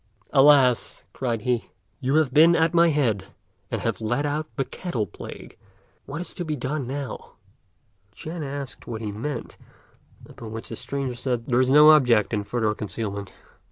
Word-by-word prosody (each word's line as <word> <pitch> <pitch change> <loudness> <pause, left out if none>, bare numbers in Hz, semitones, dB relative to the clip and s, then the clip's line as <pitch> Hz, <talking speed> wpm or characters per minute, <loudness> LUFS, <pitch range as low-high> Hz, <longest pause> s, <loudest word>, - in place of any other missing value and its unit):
"Alas!" 135 -3 +5
cried 120 -4 -2
he, 120 0 -1 0.3
"you 135 +1 0
have 155 -5 +2
been 165 +3 +7
at 165 +1 +2
my 170 0 +5
head, 120 -11 +1 0.4
and - - -3
have - - -2
let 120 +6 0
out 150 +2 -2
the 135 - -1
Cattle 125 - -3
Plague. 90 - -11 0.5
What 145 +3 -5
is 180 - -4
to 175 - -4
be 155 -2 -2
done, 135 0 -3
now?" 140 +1 -6 0.8
Ch'ên 160 0 -6
asked 140 -1 -6
what 115 -2 -5
he 105 -2 -3
meant: 120 +5 -5 0.7
upon 110 -2 -10
which 115 - -7
the 115 - -5
stranger 135 0 -3
said, 120 -2 -2
"There 125 0 +2
is 130 - +2
no 150 +3 +8
object 120 -9 +4
in 105 -1 0
further 110 -1 0
concealment. 100 -2 -5
130 Hz, 170 wpm, -24 LUFS, 115-150 Hz, 0.8 s, no